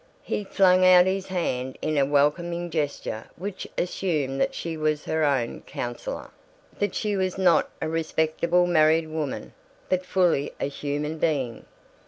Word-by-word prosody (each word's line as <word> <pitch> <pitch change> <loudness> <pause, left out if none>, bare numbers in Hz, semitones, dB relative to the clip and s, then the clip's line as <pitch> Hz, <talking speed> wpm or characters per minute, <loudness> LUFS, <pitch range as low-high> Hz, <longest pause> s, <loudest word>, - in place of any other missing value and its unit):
He 210 - -2
flung 185 -2 +4
out 180 -1 +8
his 190 0 -1
hand 130 -8 -2
in 155 0 -1
a 140 -2 +3
welcoming 170 +5 +1
gesture 145 -7 -3
which 190 +2 -6
assumed 155 -7 -1
that - - 0
she 165 -1 -4
was 155 -1 -1
her 160 0 0
own 135 -5 0
counselor, - - -5 0.5
that 205 -2 -1
she 210 -2 -1
was 185 -1 -1
not 180 -3 +4
a - - -1
Respectable 165 +2 +1
Married 160 -1 +4
Woman 155 -3 -4 0.4
but 185 0 +1
fully 180 -6 +1
a - - 0
human 145 +2 -3
being. 135 -8 -1
160 Hz, 150 wpm, -25 LUFS, 145-180 Hz, 0.5 s, out